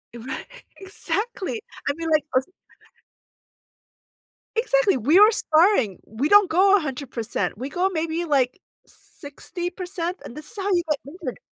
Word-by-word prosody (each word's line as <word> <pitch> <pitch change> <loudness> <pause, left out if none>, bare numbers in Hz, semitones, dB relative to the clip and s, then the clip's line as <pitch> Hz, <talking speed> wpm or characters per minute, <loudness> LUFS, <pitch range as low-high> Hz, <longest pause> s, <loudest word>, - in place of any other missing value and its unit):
Right. 255 +3 -6 0.3
Exactly. 415 +2 -4 0.3
I - - +1
mean, 330 +1 -5 0.3
os 260 +1 +2 2.1
Exactly. - - +3
We 290 - +4
are 420 +2 +8
sparring, 315 - +3
we 245 +8 -2
don't 410 -3 +6
go 385 +4 +5
100%. 260 - -3
We 260 +5 -5
go 360 +5 0
maybe, 330 +1 -2
like, 270 -2 +1 0.3
60%, 355 +4 -6
and 235 - -9
this 305 0 -10
is - - -11
how 390 0 -3
you 350 - +3
get 300 -2 +1
injured 345 +6 -7
335 Hz, 130 wpm, -23 LUFS, 275-390 Hz, 2.1 s, are